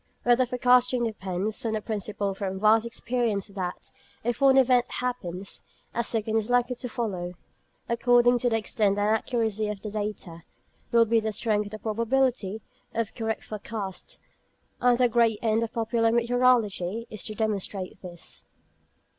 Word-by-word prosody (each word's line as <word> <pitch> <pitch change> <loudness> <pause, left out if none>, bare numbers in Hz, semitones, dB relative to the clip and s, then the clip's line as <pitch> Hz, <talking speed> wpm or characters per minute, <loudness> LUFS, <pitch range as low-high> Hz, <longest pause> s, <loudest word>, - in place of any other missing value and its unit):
Weather 245 +1 +4
forecasting 250 0 +3
depends 205 -2 -2
on 225 -2 -1
the 215 - 0
principle 205 -2 -2
from 190 -1 -4
vast 220 +2 +4
experience 230 -3 -1
that, 185 -3 -5 0.3
if 240 +2 -2
one 270 -1 +6
event 255 -2 +4
happens, 200 -7 -4 0.3
a 235 - 0
second 225 -1 0
is 220 +1 -1
likely 245 0 +2
to 245 - -5
follow. 185 -7 -3 0.5
According 245 +1 +4
to 245 - +1
the 225 - +2
extent 210 -2 +1
and 205 +1 +2
accuracy 220 -2 -1
of 210 -1 -5
the 210 - -5
data, 205 -5 -4 0.5
will 235 -1 +5
be 225 +1 +3
the 220 0 -2
strength 210 -1 0
of - - -11
the - - -4
probability 230 -1 0 0.3
of 230 -2 -1
correct 225 -1 -3
forecasts. 205 -3 -6 0.6
And 245 -1 +4
the 250 0 +4
great 230 -2 +3
end 225 0 +2
of 230 - -2
popular 230 0 +1
meteorology 235 -4 +2
is 215 - -5
to 215 - -4
demonstrate 200 -3 -3
this. 175 -2 -9
220 Hz, 155 wpm, -27 LUFS, 205-240 Hz, 0.6 s, one